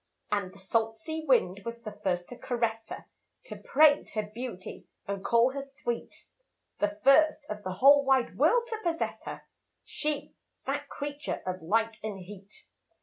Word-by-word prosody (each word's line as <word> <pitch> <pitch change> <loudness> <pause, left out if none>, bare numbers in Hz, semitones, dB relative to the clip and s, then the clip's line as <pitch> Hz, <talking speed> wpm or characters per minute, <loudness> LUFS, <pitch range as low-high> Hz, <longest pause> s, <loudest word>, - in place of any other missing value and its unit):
And 200 -3 0
the 195 - -16
salt 225 +3 0
sea 315 +8 -5
wind 200 - +3
was 235 +1 -6
the 215 - -5
first 180 -2 -1
to 245 - -8
caress 230 -2 -2
her - - -7 0.4
To - - -8
praise 295 0 +4
her 215 - 0
beauty 210 -2 -7 0.2
and 200 -1 -3
call 235 +2 +4
her 275 +1 -4
sweet, 275 -4 -5 0.5
The 205 0 0
first 305 +2 +5
of 210 0 -5
the 185 -2 -4
whole 280 +8 +7
wide 265 -2 +2
world 445 - +4
to 445 -2 -3
possess 335 -4 -2
her, - - -6 0.4
She, 300 -1 -3 0.3
that - - -2
creature 290 0 -4
of 185 -1 -3
light 225 +6 +1
and 215 -2 -4
heat. 195 +1 -12
230 Hz, 165 wpm, -29 LUFS, 205-285 Hz, 0.5 s, whole